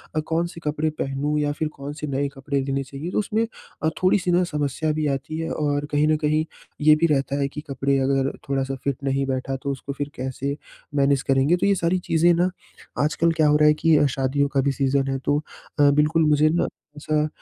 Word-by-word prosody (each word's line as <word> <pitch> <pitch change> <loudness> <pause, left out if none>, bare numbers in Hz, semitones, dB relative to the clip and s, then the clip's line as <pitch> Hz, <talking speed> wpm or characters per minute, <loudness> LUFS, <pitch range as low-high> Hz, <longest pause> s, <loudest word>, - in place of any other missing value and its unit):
अ, - - +2
कौन-से 165 +2 -2
कपड़े 150 +1 0
पहनूँ 145 0 -2
या 145 0 0
फिर 155 +2 -2
कौन-से 145 +2 -6
नए 140 +1 -1
कपड़े 140 +1 -1
लेने 135 0 -2
चाहिए। 140 +6 -7
तो - - +1
उसमें 215 +2 0 0.4
अ, 160 - +3
थोड़ी-सी 185 -1 +3
ना 175 +1 +3
समस्या 150 -1 -1
भी 155 0 -1
आती 140 +3 -3
है 165 - -3
और 145 -1 -1
कहीं 150 +1 +2
न 155 - +3
कहीं 155 +1 +1 0.4
ये 155 +1 +7
भी 160 +2 +2
रहता 140 -2 0
है 140 - +1
कि 150 +2 -7
कपड़े 140 0 0
अगर 135 0 +1 0.2
थोड़ा-सा 135 0 -1
फिट 140 -2 -1
नहीं 135 0 0
बैठा 135 0 -2
तो 140 - -1
उसको 140 +1 -5
फिर 145 +1 -4
कैसे 135 +2 -3 0.4
मैनेज 140 -1 +3
करेंगे? 135 +5 +3
तो - - 0
ये 200 0 +4
सारी 170 0 +1
चीज़ें 170 0 +3
ना 175 +2 +2 0.5
आजकल 160 +2 +2
क्या 160 -2 +2
हो 150 - +4
रहा 150 0 +5
है 150 - +6
कि 160 0 +3
शादियों 135 +2 0
का 140 -1 +1
भी 140 +1 +1
सीज़न 135 0 0
है 135 - -1
तो 145 +1 +2 0.4
बिल्कुल 150 +3 +4
अ, - - +3
मुझे 150 +1 +4
ना 170 +2 +1 0.3
ऐसा 150 0 0
145 Hz, 215 wpm, -23 LUFS, 140-155 Hz, 0.5 s, ये